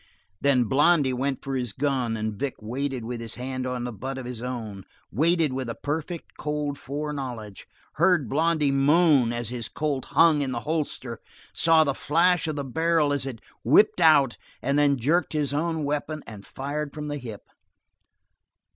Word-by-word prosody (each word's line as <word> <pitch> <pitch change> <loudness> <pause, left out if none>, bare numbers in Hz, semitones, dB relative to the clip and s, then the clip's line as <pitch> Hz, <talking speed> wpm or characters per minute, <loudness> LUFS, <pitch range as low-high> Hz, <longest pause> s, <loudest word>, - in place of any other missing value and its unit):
Then 135 -3 +4
Blondy 145 +2 +3
went 135 +1 -2
for 135 -1 -3
his 125 -5 -2
gun, 130 -4 -1
and 110 0 -2
Vic 135 +6 -3
waited 125 +2 -3
with 120 0 -5
his 115 -1 -4
hand 130 +1 -4
on 125 -1 -3
the 125 -1 -4
butt 130 +6 -5
of 130 - -6
his 120 -2 -6
own, 115 -6 -5 0.3
waited 160 - +2
with 130 -2 -3
a 115 - -4
perfect, 160 +3 -4
cold 150 -2 -2
foreknowledge, 135 - -5 0.3
heard 170 -4 +3
Blondy 155 +1 +2
moan 140 -2 +4
as 120 -2 -3
his 120 -2 -4
Colt 145 -4 -2
hung 165 -3 +4
in 135 -2 -2
the 120 - -3
holster, 150 -7 -3 0.3
saw 165 -1 +5
the 140 -2 0
flash 170 +5 +2
of 155 - -2
the 140 - -3
barrel 160 +2 +1
as 140 -1 -1
it 115 -5 -7 0.2
whipped 180 - +4
out, 145 -6 +5 0.2
and 140 +2 +1
then 140 -1 +3
jerked 155 +10 +1
his 145 -2 0
own 160 +1 -1
weapon 150 +1 -3
and 105 -2 -11
fired 145 +2 -4
from 150 -1 -5
the 145 0 -3
hip. 115 -5 -8
140 Hz, 175 wpm, -25 LUFS, 125-150 Hz, 0.3 s, saw